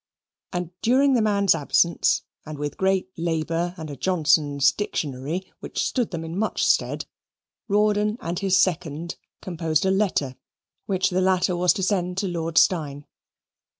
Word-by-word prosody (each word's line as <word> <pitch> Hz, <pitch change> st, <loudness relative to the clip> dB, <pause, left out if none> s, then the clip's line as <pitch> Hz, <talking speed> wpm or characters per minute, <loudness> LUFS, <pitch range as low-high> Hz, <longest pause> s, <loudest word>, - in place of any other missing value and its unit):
And 175 Hz, -2 st, -4 dB
during 270 Hz, +4 st, +3 dB
the 240 Hz, -, +3 dB
man's 200 Hz, -2 st, +3 dB
absence, 165 Hz, +2 st, +2 dB, 0.2 s
and 155 Hz, -1 st, -8 dB
with 145 Hz, 0 st, -4 dB
great 190 Hz, 0 st, 0 dB
labour 165 Hz, +1 st, -1 dB
and 160 Hz, -2 st, -6 dB
a -, -, -6 dB
Johnson's 145 Hz, -4 st, +2 dB
Dictionary, 155 Hz, -1 st, -4 dB
which -, -, -6 dB
stood 245 Hz, -4 st, -1 dB
them 165 Hz, -2 st, -5 dB
in 165 Hz, +3 st, -5 dB
much 220 Hz, -, 0 dB
stead, -, -, +1 dB, 0.6 s
Rawdon 210 Hz, +1 st, +2 dB
and 170 Hz, +2 st, -4 dB
his 190 Hz, -1 st, +2 dB
second 170 Hz, -2 st, -1 dB, 0.3 s
composed 165 Hz, -2 st, -1 dB
a 190 Hz, -, +3 dB
letter, 185 Hz, -10 st, 0 dB, 0.5 s
which 190 Hz, -2 st, +1 dB
the 185 Hz, +1 st, +1 dB
latter 185 Hz, -1 st, +2 dB
was 175 Hz, 0 st, +3 dB
to 195 Hz, -, -3 dB
send 180 Hz, -2 st, 0 dB
to 195 Hz, 0 st, 0 dB
Lord 165 Hz, -2 st, -3 dB
Steyne. 145 Hz, -5 st, +2 dB
175 Hz, 150 wpm, -24 LUFS, 160-195 Hz, 0.6 s, during